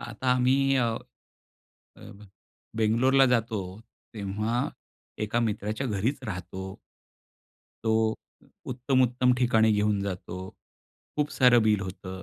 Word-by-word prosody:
आता 130 -1 -3
आम्ही 125 +1 +3 0.2
अ, 120 -3 +1 1.8
बेंगलोरला 125 +5 +4
जातो, 115 -4 +1 0.5
तेव्हा 105 +4 -2 0.5
एका 110 +2 0
मित्राच्या 110 +2 -2
घरीच 120 +6 -1
राहतो. 95 -1 -6 1.1
तो 110 0 +2 0.6
उत्तम-उत्तम 125 0 +2
ठिकाणी 110 -3 +4
घेऊन 105 -1 +1
जातो. 90 -2 -5 0.8
खूप 150 0 0
सारं 125 -3 +6
बिल 105 -2 +3
होतं. 95 0 -7
110 Hz, 95 wpm, -27 LUFS, 105-125 Hz, 1.8 s, सारं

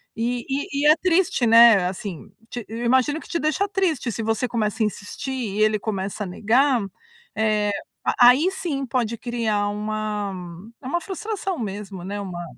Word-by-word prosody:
E 240 +1 -2
e 280 +1 -2
e - - +5
é 305 - +8
triste, 350 -6 +2
né, 230 -4 +7
assim, 180 - -6 0.2
te 240 -3 -6
eu 230 +2 -5
imagino 260 +5 +2
que - - -13
te - - -1
deixa 310 +6 0
triste 340 - 0
se 225 - -4
você 225 +3 0
começa 225 -1 -2
a - - +3
insistir 210 +5 -5 0.2
e 215 - 0
ele 215 0 +4
começa 200 0 -3
a - - -5
negar, 240 +7 +2 0.5
eh, 215 -1 +1 0.3
a 245 0 +6
aí 290 +9 +4
sim, 300 -8 -3
pode 235 -2 -1
criar 225 -4 -1
uma 210 -1 -3 0.5
é - - -8
uma 345 +6 0
frustração 390 -1 -4
mesmo, 200 -3 -6
né, 200 +3 -4
uma 180 -3 -5
230 Hz, 175 wpm, -23 LUFS, 210-275 Hz, 0.5 s, é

